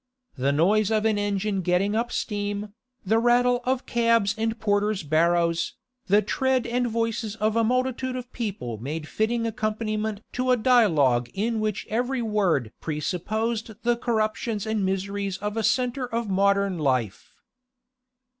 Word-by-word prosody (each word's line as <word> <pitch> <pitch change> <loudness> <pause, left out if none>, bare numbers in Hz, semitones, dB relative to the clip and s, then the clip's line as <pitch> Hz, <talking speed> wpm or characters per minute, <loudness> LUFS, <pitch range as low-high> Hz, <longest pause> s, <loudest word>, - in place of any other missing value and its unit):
The 135 +2 +1
noise 195 +8 +3
of 220 -1 +1
an 215 -2 +2
engine 205 -1 -1
getting 180 +4 +1
up 235 +2 -1
steam, 205 -1 -3 0.3
the 220 +4 +3
rattle 245 +1 +3
of 255 0 0
cabs 230 -3 +2
and 225 0 -2
porters' 205 -2 +1
barrows, 170 +2 +1 0.3
the 205 +2 +4
tread 260 +3 +1
and 245 +1 0
voices 230 -1 -2
of 215 0 0
a 230 - +3
multitude 255 +2 0
of 250 0 -7
people 190 - -4
made 150 +6 -5
fitting 230 +4 0
accompaniment 215 -1 -2
to 255 +1 -1
a 250 - +5
dialogue 160 - +3
which 215 -1 -1
in - - -10
every 245 +2 0
word 190 - +1
presupposed 215 +8 -2
the 240 0 +3
corruptions 220 -2 -1
and 220 -2 -1
miseries 195 0 -2
of 210 +2 -4
a 225 - 0
centre 250 +3 0
of 230 -1 -2
modern 200 -1 +2
life. 125 -8 -1
215 Hz, 145 wpm, -25 LUFS, 195-230 Hz, 0.3 s, a